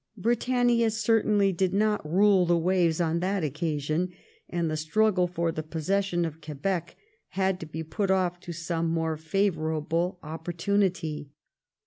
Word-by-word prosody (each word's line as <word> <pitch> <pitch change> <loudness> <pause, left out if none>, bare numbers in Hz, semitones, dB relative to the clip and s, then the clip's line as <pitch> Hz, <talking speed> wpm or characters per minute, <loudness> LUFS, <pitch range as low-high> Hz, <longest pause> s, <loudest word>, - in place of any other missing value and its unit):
Britannia 240 +1 +2
certainly 215 -2 +2
did 185 +1 0
not 210 0 +2
rule 190 -1 +4
the 175 0 +4
waves 175 -1 +2
on 170 -1 +1
that 190 0 -1
occasion, 155 +3 -1 0.4
and 170 -1 -1
the 155 - -1
struggle 180 +4 +2
for 170 -1 -1
the 155 - -4
possession 175 +3 -1
of 160 0 -6
Quebec 155 +4 -3 0.3
had 190 -1 0
to 165 - -7
be 160 +1 -5
put 195 +5 -2
off 180 -2 +1
to 175 - -8
some 165 0 -2
more 160 -1 0
favourable 160 0 -1
opportunity. 165 -1 -1
175 Hz, 140 wpm, -27 LUFS, 160-195 Hz, 0.4 s, rule